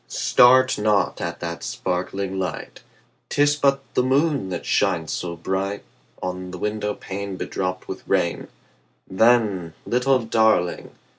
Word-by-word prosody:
start 130 0 +4
not 105 -1 +1
at 85 0 -4
that 85 0 -5
sparkling 95 +1 -3
light; 95 -2 -5 0.5
'Tis 145 0 +3
but 140 -1 +2
the - - +3
moon 135 -3 +1
that 90 -2 -5
shines 85 -5 +1
so 85 -1 -4
bright 95 +4 -3 0.4
On 90 0 -4
the 90 - -7
window 105 +1 -2
pane 100 0 -6
bedropped 95 0 -4
with - - -8
rain: - - 0 0.6
Then, 100 -5 +2
little 130 +2 +2
Darling! 110 -6 +2
100 Hz, 130 wpm, -23 LUFS, 90-120 Hz, 0.6 s, start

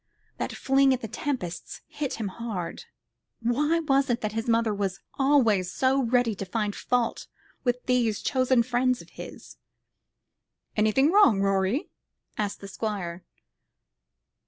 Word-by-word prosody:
That - - -3
fling 270 0 +3
at 255 - -9
the 225 - -4
Tempests 210 -9 -4
hit 285 -3 -4
him 215 -3 -3
hard. 195 -5 -5 0.5
Why 295 +8 +1
was 275 -3 +2
it 240 0 0
that 215 - -2
his 225 +2 -3
mother 230 -1 +2
was 195 -2 -2
always 230 -10 +3
so 265 +5 +2
ready 245 -2 +2
to - - -3
find 210 +1 -1
fault 245 -2 -1 0.4
with 250 -1 -1
these 240 -4 +1
chosen 255 -2 +3
friends 250 +1 +1
of - - -20
his? - - -10 1.2
"Anything 220 +8 +3
wrong, 350 - +6
Rorie?" 195 +6 +1 0.4
asked 205 -1 -3
the 200 - -7
Squire. 190 -5 -4
235 Hz, 135 wpm, -27 LUFS, 205-260 Hz, 1.2 s, wrong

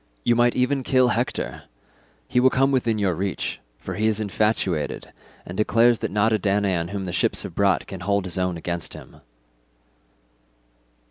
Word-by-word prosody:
You 120 - +3
might 120 0 +3
even 130 +2 +1
kill 130 -1 +3
Hector; 120 +1 -2 0.6
he 125 - +1
will 130 +1 +5
come 135 +2 +2
within 120 -4 +1
your 100 -3 +1
reach, 95 +3 -3 0.2
for - - -7
he 110 +1 0
is 110 -1 +1
infatuated, 100 -5 -1 0.3
and 90 - -8
declares 115 +3 +3
that - - -2
not 105 +2 +2
a 110 - +2
Danaan 95 -3 0
whom 100 -1 -4
the 90 - -5
ships - - +1
have - - -7
brought 100 -2 +2
can 95 - -8
hold 100 +1 0
his 90 0 -3
own 90 -2 -1
against 85 0 -4
him." - - -13
105 Hz, 175 wpm, -23 LUFS, 95-120 Hz, 0.6 s, will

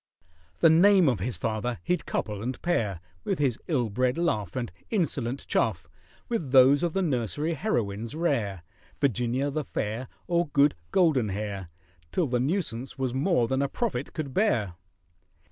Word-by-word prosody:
The 165 - +7
name 185 +1 +6
of 120 -7 +2
his 115 +6 -3
father 115 +2 -2
he'd 180 0 -1
couple 105 -2 -2
and 125 +2 -3
pair 105 - 0 0.2
(With - - -1
his 135 -6 0
ill 125 - 0
bred 125 +5 +1
laugh, 110 - -1
And 120 -2 -3 0.2
insolent 140 - -1
chaff) 85 -7 0 0.4
With 175 - -2
those 135 +2 +7
of 170 -2 0
the 195 - +1
nursery 145 - -1
heroines 115 - -2
rare— 105 - -1 0.4
Virginia 130 +1 0
the 155 +2 -2
Fair, 115 0 -3 0.2
Or 170 -1 +1
Good 145 0 +4 0.2
Goldenhair, 105 - +1 0.4
Till 180 - +1
the 125 -3 0
nuisance 135 - -2
was 130 -2 -1
more 135 -3 +2
than 130 +3 0
a 140 - 0
prophet 160 - -2
could 140 -4 -4
bear. 120 - +1
130 Hz, 155 wpm, -27 LUFS, 115-160 Hz, 0.4 s, The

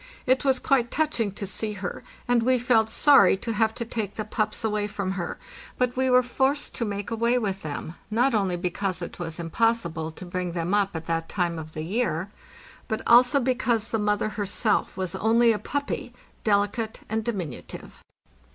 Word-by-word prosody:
It 260 +2 +3
was 265 -2 +3
quite 255 -4 +2
touching 285 -9 0
to 200 - -5
see 210 +3 -1
her, 195 -3 -5 0.3
and 245 -1 +3
we 255 +2 +3
felt 235 -3 +3
sorry 230 -6 +6
to 230 +3 -3
have 220 +1 +1
to 235 - -4
take 220 -3 -4
the 215 - -3
pups 215 +1 -2
away 210 -1 0
from 200 -2 -3
her; 185 -3 -4 0.4
but 250 -1 +1
we 260 0 +1
were 250 0 +5
forced 265 +4 0
to 235 - -2
make 205 +1 -4
away 235 +2 +2
with 195 -5 -2
them, 155 +1 -5 0.2
not 240 +5 +2
only 195 -4 +1
because 180 0 -2
it 170 - -8
was 165 -2 -4
impossible 170 -3 0
to 160 +3 -10
bring 180 -1 -3
them 170 +2 -2
up 200 -3 +1
at 160 0 -5
that 165 0 -2
time 175 -3 -1
of 155 0 -9
the 155 - -3
year, 195 -1 -1 0.6
but 220 -2 -2
also 250 +4 +6
because 240 -3 0
the 225 - 0
mother 210 0 +1
herself 210 +1 0
was 185 -3 -3
only 230 +2 +4
a 215 - 0
puppy, 280 0 -3 0.3
delicate 210 +2 0
and 220 +1 -1
diminutive. 185 - -6
215 Hz, 190 wpm, -26 LUFS, 185-240 Hz, 0.6 s, sorry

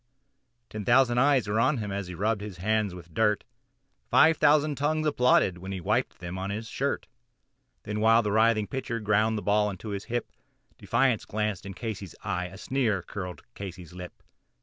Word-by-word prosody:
Ten 110 -1 -5
thousand 120 +1 +4
eyes 135 -3 +3
were 105 +2 0
on 130 +5 +3
him 105 -3 -4
as 100 -1 -3
he 90 - -7
rubbed 105 +3 0
his 105 -3 -7
hands 105 0 0
with 85 -2 -12
dirt, 105 0 +2 0.7
Five 160 0 +5
thousand 150 0 +4
tongues 155 +3 0
applauded 125 -10 +3
as 95 - -5
he 95 - -3
wiped 85 - 0
them 90 +1 -6
on 95 +1 -3
his 110 +3 -4
shirt; - - -2 0.8
And 105 0 -3
while 115 +1 +5
the 105 - -1
writhing 110 0 +3
pitcher 125 -1 -4
ground 110 +1 +2
the 105 - -4
ball 105 0 +2
into 100 +2 -7
his 100 0 -4
hip 120 -1 -3 0.5
Defiance 130 -4 +1
gleamed 105 -3 -2
from 100 -1 -9
Casey's 100 -4 -6
eye 90 0 -2
a 95 +2 -11
sneer 110 -6 0
curled 90 -1 -7
Casey's 90 -4 -8
lip. 90 0 -10
105 Hz, 185 wpm, -27 LUFS, 95-120 Hz, 0.8 s, Five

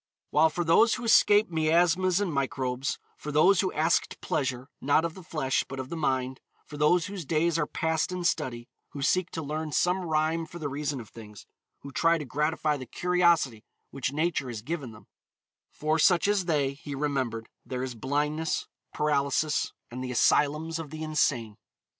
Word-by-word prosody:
While 160 +2 +5
for 175 +3 -2
those 195 +8 +4
who - - -7
escaped 210 -3 +5
miasmas 170 +3 +2
and 195 -6 -1
microbes; 135 -2 -2 0.2
for 150 - -6
those 180 +6 +5
who 190 - -1
asked 160 +2 +1
pleasure, 130 -3 -2
not 145 +4 +3
of 165 - -3
the 190 - -11
flesh, 155 -6 -1
but 135 - -7
of 130 0 -5
the - - -4
mind; 130 -4 -1 0.3
for 150 - -10
those 160 +4 +3
whose 200 -3 -6
days 165 +3 +1
are 150 - 0
passed 160 +2 -1
in 180 -1 -3
study, 130 -8 -1 0.3
who 140 - -5
seek 185 +4 +2
to 160 - -5
learn 155 +1 -4
some 180 +5 +2
rhyme 160 0 0
for 175 - -10
the 150 -4 -4
reason 140 0 -3
of 115 - -10
things, 105 -2 -12 0.4
who 140 - -9
try 165 +4 +3
to 150 - -5
gratify 150 +3 0
the 130 -2 -8
curiosity 170 -9 +2 0.3
which 135 -1 -2
Nature 155 -2 -1
has 115 -3 -6
given 145 -4 -4
them; 110 - -15 0.6
for 155 +1 -1
such 175 +3 +4
as 205 -3 +1
they, 145 -5 +1
he 145 0 -8
remembered, 130 -6 -2 0.2
there 130 -1 -4
is 130 -1 -4
blindness, 150 +6 -1 0.3
paralysis, 150 0 +1 0.2
and 130 +2 -5
the 130 - -4
asylums 150 +6 +2
of 160 -3 -6
the 155 +1 -6
insane. 130 -8 0
150 Hz, 185 wpm, -28 LUFS, 135-165 Hz, 0.6 s, While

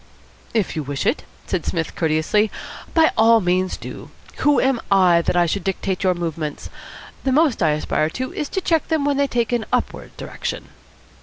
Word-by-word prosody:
"If 215 -5 0
you 155 - -1
wish 140 -1 -4
it," - - 0 0.2
said 185 -4 -2
Psmith 165 -2 -3
courteously, 160 +7 +1 0.5
"by 320 -1 +5
all 225 +1 +5
means 185 -1 0
do. - - -9 0.3
Who 290 -1 +3
am 265 -3 +1
I 180 -3 +5
that 175 - 0
I 175 - +4
should 195 +4 -2
dictate 190 -1 -2
your 185 -1 +3
movements? 165 -3 -4 0.5
The 265 - +1
most 290 -4 +3
I 160 - +4
aspire 155 0 0
to 255 +10 -5
is 295 - -3
to 380 - -2
check 325 -3 +1
them 315 -3 0
when 285 -1 +1
they 280 0 +2
take 240 -3 -1
an 235 -2 -1
upward - - -2
direction." - - -5
195 Hz, 185 wpm, -21 LUFS, 170-265 Hz, 0.5 s, by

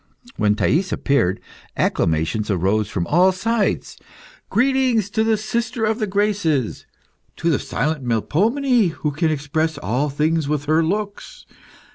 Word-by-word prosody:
When 105 -1 +2
Thais 165 - +1
appeared, 100 -9 +1 0.4
acclamations 80 +7 0
arose 100 +3 +1
from 85 -5 -2
all 180 - +4
sides. 220 +2 -1 0.5
Greetings 250 -5 +2
to 220 0 +1
the 220 -1 +2
sister 225 +2 -2
of 220 +2 0
the 215 - -1
Graces! 190 - 0 0.5
To 165 +1 0
the 145 - +1
silent 140 +2 -2
Melpomene, 205 - +1
who 150 0 -2
can 160 +3 0
express 155 +1 -1
all 140 +2 -1
things 155 +2 0
with 145 -1 -1
her 155 +2 +3
looks! 205 +4 -4
160 Hz, 135 wpm, -21 LUFS, 135-215 Hz, 0.5 s, all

